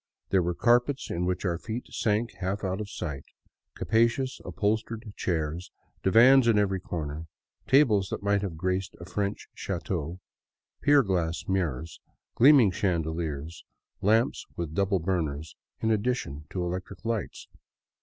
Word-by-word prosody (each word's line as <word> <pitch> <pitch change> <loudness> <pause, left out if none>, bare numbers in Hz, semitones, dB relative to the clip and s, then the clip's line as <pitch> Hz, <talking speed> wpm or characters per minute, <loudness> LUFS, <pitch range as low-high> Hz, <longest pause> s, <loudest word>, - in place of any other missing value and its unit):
There 95 - +3
were 85 0 -1
carpets 120 +5 +2
in 90 +1 -1
which 90 +2 -2
our 85 -3 0
feet 115 +5 -5
sank 110 +2 0
half 95 +2 -2
out 95 +1 -1
of 105 - -6
sight, 70 -8 -5 0.5
capacious 115 +4 +1
upholstered 110 +1 -2
chairs, 85 0 -2 0.3
divans 120 +6 +6
in 115 -2 +4
every 95 -2 +1
corner, 80 -2 -5 0.4
tables 110 -9 +4
that - - -4
might 100 0 +2
have 95 -6 -4
graced 95 +2 -2
a 85 - -8
French 100 +2 -3
chateau, 85 -1 -4 0.6
pier 145 -1 +5
glass 85 -5 -1
mirrors, 85 -5 -2 0.3
gleaming 130 -5 +6
chandeliers, 80 -4 -2 0.4
lamps 110 +6 +2
with 85 -3 -4
double 100 +2 +2
burners, 80 -4 -2 0.3
in 110 - +2
addition 105 - -1
to 90 - -3
electric 90 +4 -5
lights. 115 -2 -3
95 Hz, 135 wpm, -28 LUFS, 85-110 Hz, 0.6 s, divans